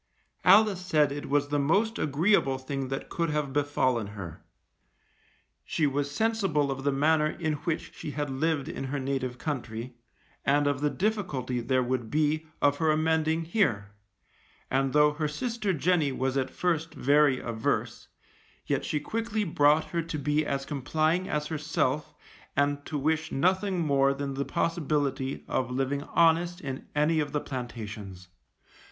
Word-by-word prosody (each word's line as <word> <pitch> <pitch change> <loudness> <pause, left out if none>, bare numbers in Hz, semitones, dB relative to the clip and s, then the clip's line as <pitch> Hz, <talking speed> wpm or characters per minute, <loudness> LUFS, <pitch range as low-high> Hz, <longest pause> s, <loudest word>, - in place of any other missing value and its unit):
Alice 195 -1 +5
said 155 -6 +3
it 145 0 -5
was 145 0 +1
the 145 0 +1
most 200 +11 +1
agreeable 145 -2 +2
thing 135 0 -4
that 135 +1 -4
could 170 -1 -1
have 150 -3 -1
befallen 130 -6 +1
her. 95 -6 -8 1.2
She 155 - 0
was 140 0 0
sensible 190 -6 +1
of 135 0 -4
the 140 - +2
manner 150 +2 +3
in 155 0 -2
which 165 -3 -2
she - - -7
had 145 0 -2
lived 150 +1 0
in 160 - -5
her 140 +2 -3
native 130 -2 -2
country, 125 -4 -4 0.5
and 145 +1 +3
of 145 -1 0
the 150 - +2
difficulty 160 - -1
there 130 +2 +1
would 120 -2 -2
be 155 +2 +1 0.2
of 145 0 +4
her 160 0 +1
amending 160 +1 +2
here, 115 - 0 0.8
and 135 0 +1
though 150 +1 +4
her 150 0 -1
sister 225 - -2
Jenny 165 -3 +2
was 130 0 -1
at 135 -1 0
first 165 -2 -1
very 145 -1 +4
averse, 115 -2 -2 0.6
yet - - 0
she 150 - -1
quickly 220 +5 -2
brought 155 -3 +3
her 170 - 0
to 165 -1 -5
be 150 +2 +1
as 135 -1 -2
complying 155 +6 0
as 150 0 -1
herself 150 -2 -1 0.4
and 145 0 +1
to 150 - -3
wish 160 +3 0
nothing 185 +4 +1
more 140 -1 +3
than 140 0 -3
the 140 +1 -2
possibility 145 -5 -1
of 125 -2 -1
living 135 +2 -1
honest 170 +3 +2
in 135 -4 -6
any 155 +2 +3
of 145 -1 -2
the 150 - +1
plantations. 105 -7 -7
145 Hz, 160 wpm, -28 LUFS, 135-160 Hz, 1.2 s, Alice